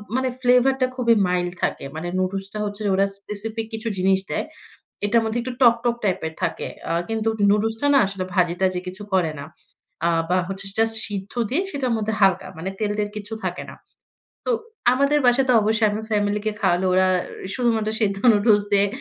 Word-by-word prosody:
মানে 260 0 +1
ফ্লেভার 250 +1 +4
টা 255 - +4
খুবই 235 -3 +3
মাইল্ড 180 -1 -1
থাকে। - - -1
মানে 160 +2 -4
নুডলস 195 +1 -2
টা 215 - -4
হচ্ছে 205 +1 -4
যে - - +2
ওরা 195 +1 +3
স্পেসিফিক 215 +3 -5
কিছু 220 +1 -4
জিনিস 190 +1 +3
দেয়। - - -2 0.6
এটার 230 +3 +3
মধ্যে 220 +1 -1
একটু 255 +1 -4
টক, 235 -2 +7
টক 240 -1 +1
টাইপ 190 -3 +1
এর 160 - -5
থাকে। - - -2 0.2
আ - - +2 0.2
কিন্তু 225 0 -1 0.2
নুডলসটা 225 +5 +1
না - - +7
আসলে 195 -1 -4
ভাজি 175 -2 +2
টাজি 185 -1 +1
কিছু 185 +3 -7
করে 175 -4 +2
না। 140 - -7 0.6
আ - - +4 0.2
বা 180 - +3
হচ্ছে 195 0 -5
জাস্ট 225 0 +4
সিদ্ধ 200 -1 -6 0.2
দিয়ে 310 +9 +1
সেটার 270 -6 -1
মধ্যে 220 0 -2
হালকা, 190 -1 +3
মানে 180 +4 -4
তেল 210 -1 0
টেল 210 0 0
কিছু 210 +1 -6
থাকে - - -3
না। - - -11 0.7
তো - - +1 0.4
আমাদের 280 +3 +3
বাসায় 250 +2 +4
তো - - +5
অবশ্যই 220 +1 +2
আমি 210 +1 -3
ফ্যামিলিকে 210 0 0
খাওয়ালে, 175 +2 +2
ওরা 185 +1 +4 0.5
শুধুমাত্র 225 -4 +1
সেদ্ধ 200 -2 +1
নুডলস 210 0 +4
দিয়ে 200 0 +4
210 Hz, 195 wpm, -22 LUFS, 190-230 Hz, 0.7 s, টক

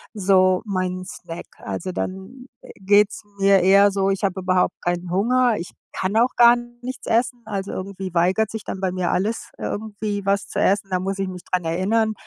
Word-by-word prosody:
so 185 -1 +3
meinen 185 -2 -2
Snack. 175 -2 -8
Also, 100 - -5
dann, 195 +10 -6
äh, - - -12
geht‘s 205 +2 +3
mir 195 0 +5
eher 200 +2 +6
so 195 0 +1
ich 195 +2 -1
habe 190 -1 -2
überhaupt 185 0 +2
keinen 175 0 -2
Hunger, 240 +5 +2
ich 170 - -6 0.2
kann 190 +3 -1
auch 245 +3 +3
gar 240 0 +8 0.3
nichts 255 +1 -7
essen, 240 +1 0
also 200 -2 -4
irgendwie 190 0 -5
weigert 185 +5 +2
sich 220 -2 -6
dann 190 - -5
bei 190 -1 -1
mir 180 -1 -1
alles 215 +5 -2
irgendwie 205 -1 -4
was 200 0 +1
zu - - -7
essen. 195 0 +2
Da 185 - 0
muss 195 +1 -3
ich 195 - -1
mich 180 -1 -8
daran 180 -2 0
erinnern, 215 +7 +1
195 Hz, 190 wpm, -22 LUFS, 185-210 Hz, 0.3 s, gar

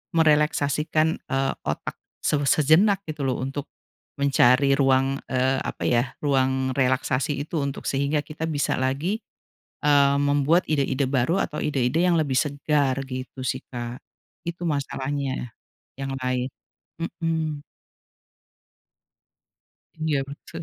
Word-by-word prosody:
merileksasikan, 155 0 +2
eee, 135 0 0
otak 75 - -3 0.2
se 150 - +2
sejenak 175 +8 +4
gitu 150 -3 -3
loh 130 - -1
untuk 135 +2 -4 0.5
mencari 140 0 +4
ruang, 135 0 +3
eee, 130 +1 +1
apa - - -4
ya, 120 +2 +1
ruang 130 -2 +1
relaksasi 130 +2 +1
itu 160 +2 -4
untuk 140 -1 -3
sehingga 140 +2 +1
kita 155 +2 -8
bisa 150 -3 0
lagi, 140 +10 0 0.6
eee, 140 -2 +4
membuat 145 +4 +3
ide-ide 140 -2 +1
baru 135 +7 +1
atau 150 - -2
ide-ide 140 +2 +1
yang 170 - +3
lebih 145 -4 0
segar, 145 -1 +1
gitu 130 0 -6
sih, 130 0 -1
Kak. 120 0 -5 0.4
Itu 170 +1 -5
masalahnya 140 -4 -2 0.5
yang 135 0 -3
lain, 125 0 0 0.6
mhm. 160 -3 -2 2.3
Iya 155 -3 0
betul. 165 +4 -9
140 Hz, 115 wpm, -25 LUFS, 130-155 Hz, 2.3 s, sejenak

